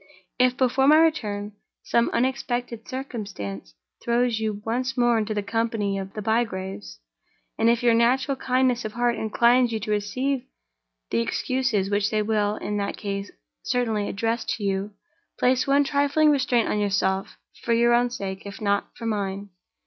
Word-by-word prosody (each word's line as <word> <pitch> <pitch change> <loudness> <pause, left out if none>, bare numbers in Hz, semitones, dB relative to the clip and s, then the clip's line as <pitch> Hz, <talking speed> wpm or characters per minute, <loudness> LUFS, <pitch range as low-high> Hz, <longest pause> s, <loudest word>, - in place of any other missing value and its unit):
If, 250 0 +3
before 265 +1 +2
my 305 +2 +7
return, 215 -11 +1 0.3
some 235 0 +2
unexpected 245 -2 -2
circumstance 200 - -6 0.3
throws 235 -1 +1
you 215 -2 -3
once 255 +3 -2
more 240 -1 +3
into 215 0 -2
the 205 - -1
company 220 -2 -1
of 195 0 -7
the 215 - -5
Bygraves, 190 - -2 0.6
and 230 - +4
if 235 +1 +2
your 240 -1 +5
natural 255 +4 +2
kindness 255 -1 +1
of 215 - -5
heart 240 0 +1
inclines 235 +3 +3
you 220 - -2
to 210 - -3
receive 245 +6 -1 0.7
the 115 - +2
excuses 225 - -1
which 205 0 +1
they 215 -1 0
will, 210 -1 0
in 210 -1 -3
that 200 0 -2
case, 200 -1 -4 0.3
certainly 225 -4 -1
address 225 +3 -1
to 220 - -8
you, 195 0 -1 0.5
place 255 +1 +2
one 280 +1 +4
trifling 285 +2 +3
restraint 255 -4 +2
on 210 - 0
yourself, 195 -1 0 0.3
for 235 - +1
your 235 +1 +4
own 245 +1 +3
sake, 195 -5 -5
if 200 - -8
not 200 -1 0
for 230 - -7
mine. 200 -2 -2
225 Hz, 165 wpm, -24 LUFS, 205-250 Hz, 0.7 s, my